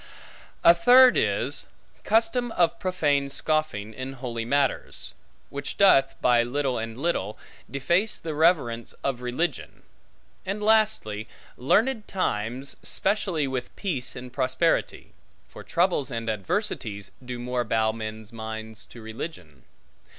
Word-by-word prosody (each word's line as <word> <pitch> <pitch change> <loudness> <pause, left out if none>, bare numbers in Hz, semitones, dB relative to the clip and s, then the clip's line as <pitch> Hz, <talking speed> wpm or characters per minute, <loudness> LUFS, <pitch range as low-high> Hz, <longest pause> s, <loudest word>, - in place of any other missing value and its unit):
A 170 - +9
third 250 +8 +7
is, - - 0 0.4
custom 230 +2 +2
of 175 -2 +2
profane 150 -7 +1
scoffing 140 -8 -1
in 130 +3 -6
holy 120 -3 -4
matters; 140 +2 -1 0.4
which 140 0 -5
doth, 135 -9 +5
by 120 -1 +5
little 130 +1 -1
and 115 0 -5
little, 130 - -1 0.3
deface 170 - +1
the 160 -2 -5
reverence 145 -8 +1
of 135 -3 -1
religion. 125 +8 -3 0.6
And 200 +2 -3
lastly, 215 - +2 0.3
learned 220 - +1
times, 130 - -2
specially 190 -7 0
with 130 -2 -4
peace 155 -11 -3
and 125 0 -8
prosperity; 130 +5 0 0.3
for - - -11
troubles 175 -6 +1
and 115 -3 -2
adversities 105 - -3
do 125 0 -5
more 125 0 -2
bow 110 -1 +1
men's 110 0 -7
minds 110 0 -7
to 115 - -13
religion. 110 - -8
135 Hz, 120 wpm, -26 LUFS, 115-175 Hz, 0.6 s, A